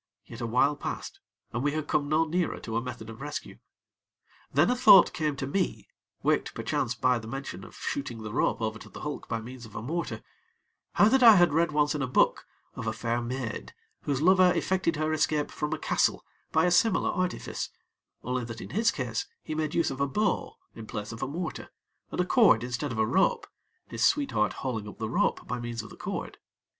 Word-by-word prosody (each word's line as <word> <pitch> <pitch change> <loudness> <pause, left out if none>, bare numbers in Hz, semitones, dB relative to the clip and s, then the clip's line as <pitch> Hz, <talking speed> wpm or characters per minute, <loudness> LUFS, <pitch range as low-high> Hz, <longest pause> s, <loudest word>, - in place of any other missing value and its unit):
Yet, - - -10
a 115 - -2
while 130 +5 +3
passed, - - -6 0.3
and 120 - -1
we 145 +1 0
had 155 -1 -3
come 145 -1 0
no 155 +2 +3
nearer 170 +2 -1
to 115 - -5
a 115 - +1
method 125 -3 -7
of 110 +3 -11
rescue. 145 -4 -6 0.9
Then 145 - +4
a - - +2
thought 245 -7 +7
came 155 -4 -1
to 135 - -3
me 180 +7 -2 0.3
(waked - - +1
perchance - - -1
by 125 -1 +2
the 110 - -10
mention 135 +4 -6
of - - -12
shooting 125 -5 -4
the 105 0 -6
rope 115 - +1
over 110 0 -2
to - - -12
the - - -10
hulk 150 -1 -5
by 115 - -1
means 125 +2 -9
of 105 - -17
a - - -4
mortar) 170 +7 -3 0.7
how 205 - +6
that 265 +4 +4
I 230 -3 +10
had 175 -5 +5
read 165 +1 +2
once 150 0 +2
in 150 - -2
a 130 - 0
book, 125 - +2 0.3
of - - -6
a - - 0
fair 120 0 -1
maid 120 -1 -5 0.3
whose 140 0 -1
lover 185 0 +6
effected 185 -3 0
her 155 +1 0
escape 150 -1 +1
from 150 - -3
a - - -1
castle - - +1 0.3
by 160 +1 +3
a 180 - +2
similar 205 +3 +3
artifice, 185 -1 -2 0.5
only 125 0 -2
that 115 -1 -7
in - - -8
his 225 +3 +3
case 125 - -3 0.2
he - - -5
made 155 -1 -2
use 170 - +2
of 135 0 -5
a 140 - +2
bow 210 +9 -1 0.2
in 110 -1 -10
place 105 0 -5
of 115 - -8
a 135 - -1
mortar, 165 +4 -5 0.4
and - - -5
a 180 - +3
cord 185 - +5
instead 125 +3 -3
of 115 - -4
a 110 - +3
rope, 190 - +2 0.4
his - - -4
sweetheart 275 - +2
hauling 110 -5 -2
up 105 - -10
the 110 - -3
rope 115 - 0
by 125 - -3
means 120 -1 -4
of - - -11
the - - -10
cord. - - -5
145 Hz, 220 wpm, -28 LUFS, 120-170 Hz, 0.9 s, I